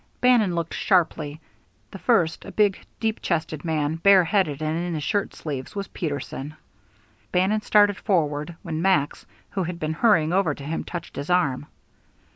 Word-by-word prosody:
Bannon 235 -8 +4
looked 170 -1 -3
sharply; 160 -6 +1 0.5
the 195 - -9
first, 175 -10 +2
a - - -9
big, 205 -3 +2 0.2
deep 220 -1 -1
chested 160 -3 -2
man, 160 -2 -1
bare 190 +2 +6
headed 165 -5 +1
and 155 0 -1
in 175 0 -2
his 150 - -3
shirt 205 +4 -1
sleeves, 140 +1 -6
was 200 -1 -3
Peterson. 145 -1 -5 0.8
Bannon 190 +4 +2
started 205 -2 +4
forward, 155 -4 0
when 160 0 -3
Max, 160 -6 +1 0.2
who 195 - -2
had 175 -1 -4
been 155 -1 -2
hurrying 165 -4 +3
over 185 -6 +2
to 140 - -10
him, 155 +3 -3
touched 170 -1 -7
his 145 - -5
arm. 145 -6 +1
170 Hz, 165 wpm, -24 LUFS, 155-195 Hz, 0.8 s, bare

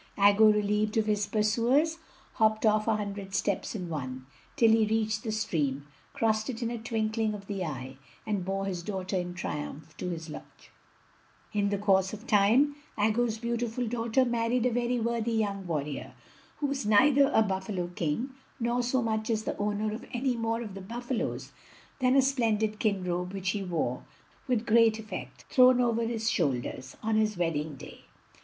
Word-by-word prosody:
Aggo, 205 +2 +6
relieved 210 +1 +1
of 220 - +3
his 210 -1 0
pursuers, 240 +10 +2 0.3
hopped 220 0 +2
off 215 0 +3
a 225 - +3
hundred 200 -2 -5
steps 200 +2 -1
in 185 -4 -4
one, 130 -5 -5 0.3
till 230 -2 +5
he 220 -1 +4
reached 220 0 0
the 220 - -3
stream, 150 -11 -1 0.3
crossed 220 0 0
it 240 -1 -4
in 230 - -1
a 235 - -4
twinkling 220 -1 -1
of 200 -1 -9
the 195 -2 -3
eye, 130 -4 -6 0.3
and 205 -4 -1
bore 195 +1 -2
his 185 -3 -3
daughter 190 0 -4
in 180 -1 -2
triumph 150 -2 -5
to 180 - -3
his 165 -2 -5
lodge. 155 - -11 0.8
In 205 -1 +1
the 200 - 0
course 190 -1 +2
of 215 +3 -8
time 235 +8 +4 0.2
Aggo's 220 +2 +1
beautiful 235 +1 -2
daughter 235 +2 +1
married 240 0 +1
a 250 - +3
very 245 +1 0
worthy 235 0 -1
young 200 -4 -1
warrior, 150 -3 -4 0.4
who 295 - -2
was 275 -2 -1
neither 275 +7 +5
a 220 - +5
buffalo 190 -2 -2
king 175 - -2 0.3
nor 240 +1 +1
so 245 +1 +1
much 220 0 -1
as 220 -1 0
the - - -3
owner 210 +1 -1
of 225 - -6
any 250 +1 0
more 230 0 -1
of 210 -4 -8
the 195 - -7
buffalos 240 +4 -4 0.5
than 255 0 +3
a 270 - +6
splendid 225 -5 +1
skin 210 -3 0
robe 180 +1 -2
which 190 -1 -1
he 205 - -3
wore, 165 -9 -2 0.4
with 240 -3 0
great 225 -1 +5
effect, 220 -1 -8
thrown 255 -1 +6
over 235 -2 +2
his 225 -1 -2
shoulders, 135 - -1
on 220 0 +1
his 215 -2 +1
wedding 160 -3 -1
day. - - -12
215 Hz, 180 wpm, -29 LUFS, 195-235 Hz, 0.8 s, Aggo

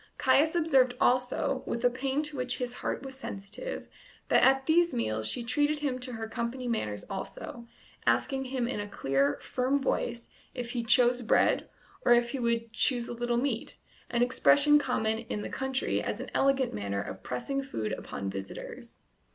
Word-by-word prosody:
Caius 285 +5 +4
observed 270 -7 +3
also, 250 0 +2
with 235 - -2
a - - +7
pain 270 +3 -1
to 300 -1 -2
which 250 -1 -1
his 245 -1 -3
heart - - -2
was 270 -1 -7
sensitive, 235 - -6 0.4
that - - +5
at 270 0 +4
these 340 -2 +3
meals 110 - -1
she 240 - -1
treated 295 +5 +1
him 265 -4 -1
to 250 0 -3
her 225 -1 -4
company 235 +3 -3
manners 105 - -2
also, 235 +4 -6 0.4
asking 270 -1 +2
him 255 -2 -1
in 240 - -3
a 205 - -4
clear, 140 -6 +1
firm 260 +2 0
voice 240 -3 -2 0.3
if 245 -2 -4
he 240 -1 -2
"chose 245 +1 +4
bread" 225 - +2 0.3
or - - +6
if 240 0 +1
he 275 - -3
would 230 -1 -1
"choose 240 0 +2
a - - -5
little 240 0 -1
meat," 245 -2 -2 0.3
an 240 0 +2
expression 290 +4 +5
common 220 -5 0
in 220 -2 -4
the - - -5
country 265 0 -1
as - - -3
an - - -7
elegant 270 -2 +2
manner 100 -1 -2
of 95 - -8
pressing 275 - -2
food 110 - -4
upon 100 - -5
visitors. 95 0 -7
245 Hz, 180 wpm, -29 LUFS, 230-270 Hz, 0.4 s, a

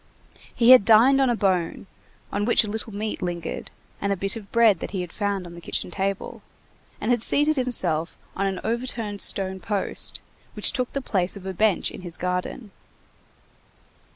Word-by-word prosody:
He 240 0 +5
had 255 -5 +9
dined 235 +6 +5
on 265 - +3
a 240 - +2
bone, 185 -6 -1 0.5
on 205 - -1
which 235 - +4
a - - -5
little 220 +1 -3
meat 210 +1 -4
lingered, 175 -2 -4 0.3
and 200 - -1
a - - +2
bit 195 +4 0
of 210 -3 -10
bread 225 -6 +4
that - - -5
he 190 -2 -3
had 175 -2 -7
found 200 -3 -2
on 170 - -10
the 170 - -11
kitchen 175 - -3
table, 195 +1 -3 0.6
and 220 - -1
had 240 -2 +2
seated 295 +6 +2
himself 185 - +1 0.2
on 195 0 0
an 190 -2 -3
overturned 230 -3 -3
stone 190 -1 0
post, 200 +1 -2 0.4
which - - +5
took 255 -4 -2
the 275 - -3
place 190 -3 -1
of 190 - -12
a 190 - -4
bench 210 0 +1
in - - -10
his 175 -2 -4
garden. 180 +4 -4
200 Hz, 185 wpm, -24 LUFS, 185-230 Hz, 0.6 s, had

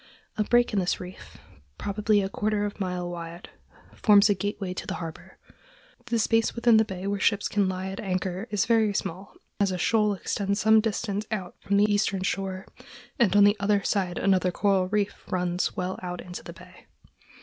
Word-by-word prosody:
A 215 - +1
break 240 +1 +2
in 205 - +2
this 180 -1 0
reef, 180 0 -10 0.4
probably 205 0 +1
a - - -1
quarter 210 +1 -1
of 205 - -4
a - - -22
mile 180 -2 -2
wide, 170 0 -8 0.4
forms 205 -1 +5
a - - +5
gateway 200 -1 -3
to - - -7
the - - -3
harbor. 165 -2 -8 0.7
The 235 -1 0
space 225 0 +2
within 235 -1 +5
the 220 - +5
bay 190 -3 -7
where 200 0 -1
ships 200 +1 +2
can 200 -2 +1
lie 185 0 -4
at 195 - -7
anchor 185 +1 -3
is 210 -3 +1
very 220 -3 +2
small, 190 +3 -4 0.2
as 200 -2 +2
a 185 - -2
shoal 210 +2 +2
extends 200 +2 -2
some 220 0 +5
distance 215 -1 -2
out 190 -5 -4
from 200 0 +1
the 205 - +5
eastern 205 -2 +1
shore, 190 -1 -3 0.5
and 205 -6 +3
on 205 - +7
the 205 +1 +5
other 200 0 +1
side 185 -4 -1
another 185 -2 +2
coral 190 0 +1
reef 205 +1 -2
runs 180 -1 -1
well 185 +1 -3
out 180 -1 -5
into 180 0 -8
the - - -9
bay. - - -16
200 Hz, 195 wpm, -26 LUFS, 185-210 Hz, 0.7 s, on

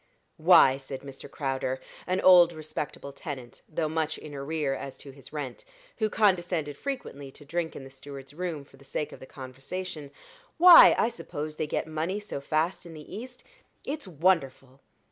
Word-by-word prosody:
"Why," 160 -5 +6
said 135 -1 -8
Mr. 135 -1 -10
Crowder, 130 -2 -2 0.3
an 185 +1 0
old 175 -2 +7
respectable 150 -2 -6
tenant, 130 -8 -8
though 155 0 -1
much 160 0 -1
in 150 - -10
arrear 140 0 -2
as 135 0 -6
to 140 - -11
his 135 -1 -14
rent, 145 -5 -6 0.3
who 215 -1 +1
condescended 175 -8 +1
frequently 145 - -6
to 145 +2 -15
drink 165 +2 -3
in - - -7
the 135 - -11
steward's 135 0 -10
room 165 -3 -4
for 135 - -20
the 140 - -18
sake 145 +2 -4
of - - -11
the 130 - -11
conversation; 140 +5 -7 0.5
"why, 355 0 +10
I - - +3
suppose 155 -10 -6
they 155 - -1
get - - -1
money 160 +5 -2
so 205 -9 -6
fast 160 +5 0
in 170 -2 -11
the 150 -1 -10
East 250 +3 -9 0.4
it's 290 -5 -4
wonderful. 140 -6 0
155 Hz, 175 wpm, -28 LUFS, 135-175 Hz, 0.5 s, why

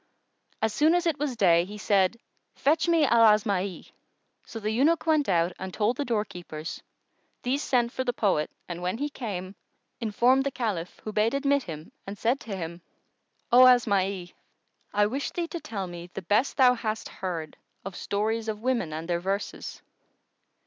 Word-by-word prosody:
As 220 -1 +1
soon 310 +4 +4
as 355 0 +1
it 320 -3 0
was 285 -4 -1
day, 170 -5 +4
he 205 +4 -8
said, 200 0 +2 0.4
"Fetch 315 +4 +2
me 335 -3 +4
Al 235 -3 +4
Asma'i!"[FN#114] 200 -3 -3 0.6
So 225 - -7
the 215 0 -2
eunuch 295 +8 +2
went 310 -5 +2
out 170 -1 +2
and 190 0 -5
told 215 +5 +1
the 290 - -1
doorkeepers; 180 - -4 0.6
these 265 +3 0
sent 240 -5 +1
for 260 - -2
the 250 - 0
poet 195 -10 +1 0.2
and 175 0 -6
when 180 +4 -2
he 290 +3 -2
came, 195 -9 -5 0.5
informed 245 +4 +3
the 275 - 0
Caliph 205 -10 -3
who 215 - -4
bade 220 +5 +2
admit 280 0 +2
him 155 - -8 0.2
and 200 +1 -6
said 240 +6 +1
to 210 -4 -6
him, 170 0 -6 0.7
"O 255 +1 +9
Asma'i, 200 -7 +2 0.6
I 205 0 +3
wish 265 +7 -2
thee 345 -1 -3
to 340 - -5
tell 200 -9 -5
me 175 -1 -8
the 195 - -5
best 210 +9 +1
thou 255 -2 +6
hast 220 -2 -3
heard 170 -5 -5 0.3
of 195 -2 -6
stories 220 +4 -1
of 215 0 -4
women 240 -11 0
and 160 +1 -5
their 175 -1 0
verses." 195 +3 -4
215 Hz, 175 wpm, -27 LUFS, 185-255 Hz, 0.7 s, O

